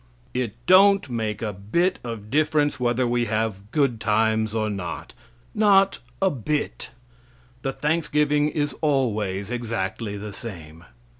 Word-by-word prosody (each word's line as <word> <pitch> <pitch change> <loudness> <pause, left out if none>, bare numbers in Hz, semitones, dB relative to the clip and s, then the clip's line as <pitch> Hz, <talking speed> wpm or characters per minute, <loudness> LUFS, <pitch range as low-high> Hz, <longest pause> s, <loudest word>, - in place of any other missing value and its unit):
It 125 -4 -2
don't 195 -4 +5
make 110 -2 -2
a 105 -2 -2
bit 145 - 0
of 115 -3 -7
difference 150 -3 +2
whether 125 +1 +1
we 120 0 +1
have 110 -2 -2
good 135 -7 +1
times 110 0 +1
or 110 -1 0
not 100 -5 -5 0.4
not 195 -2 +4 0.2
a 190 -1 +3
bit; 145 +3 -3 0.7
the 135 - -1
thanksgiving 150 0 +1
is 145 -2 -1
always 110 -9 0
exactly 110 -3 -3
the 105 0 -7
same. 85 -6 -9
120 Hz, 130 wpm, -24 LUFS, 105-150 Hz, 0.7 s, don't